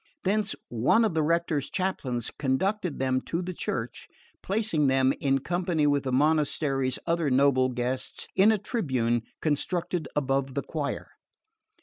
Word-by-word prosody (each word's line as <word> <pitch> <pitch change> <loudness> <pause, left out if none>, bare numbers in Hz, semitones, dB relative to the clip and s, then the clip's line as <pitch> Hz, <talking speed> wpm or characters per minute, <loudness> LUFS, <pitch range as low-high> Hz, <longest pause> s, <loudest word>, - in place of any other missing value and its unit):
Thence 205 +2 +1
one 125 - +3
of 210 - 0
the 160 - +1
rector's 160 -2 0
chaplains 135 - -2
conducted 175 +6 0
them 130 -1 +1
to 165 - -2
the 180 +1 -4
church, 120 -7 -4 0.3
placing 195 -8 +1
them, 135 0 +3
in 135 -1 +2
company 170 +1 0
with 145 -1 +2
the 130 - -1
monastery's 140 -2 +1
other 165 -3 +1
noble 130 -1 +4
guests, 125 +1 -3
in 205 +3 +6
a 220 - +2
tribune 130 - 0 0.2
constructed 165 +1 -1
above 135 -2 0
the 140 - -1
choir. 145 -3 -4
145 Hz, 140 wpm, -27 LUFS, 130-175 Hz, 0.3 s, in